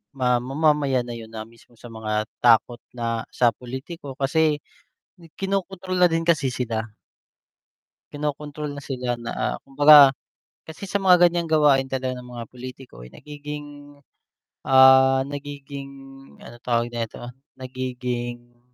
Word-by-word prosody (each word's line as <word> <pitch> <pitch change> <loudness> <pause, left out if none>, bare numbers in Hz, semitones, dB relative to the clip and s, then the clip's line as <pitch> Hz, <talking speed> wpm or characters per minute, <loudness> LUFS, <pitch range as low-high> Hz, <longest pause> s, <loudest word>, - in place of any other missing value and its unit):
ma 125 -2 +2
mamayan 140 -1 +1
na 120 - -8
yun 115 -1 -8
na 110 -1 -7
mismo 115 +1 -21
sa 120 +1 -13
mga 110 -1 -2 0.2
takot 120 0 +3 0.2
na 115 -1 -3
sa 120 -2 +4
pulitiko 130 +3 -9
kasi 150 +2 +1 0.7
kinokontrol 190 -1 -3
na 175 - +6
din 165 0 -1
kasi 150 -6 +2
sila. 120 -3 -2 1.3
Kinokontrol 150 0 -4
na 140 - -8
sila 125 -2 -3
na 120 0 -3
kumbaga 145 0 +7 0.5
kasi 160 +4 -12
sa 200 - +1
mga 180 -2 +5
gan'yang 170 -1 -2
gawain 145 -4 +3
talaga 130 -1 -3
ng 125 - -11
mga 120 -1 -8
pulitiko 125 - -11
ay - - -17
nagiging, 150 0 -8 1.0
ah, 130 0 +6
nagiging 140 0 -8 0.5
ano 120 - -12
tawag 120 0 -1
nito 120 +1 -6 0.2
nagiging 125 -2 -6
130 Hz, 130 wpm, -23 LUFS, 120-150 Hz, 1.3 s, kumbaga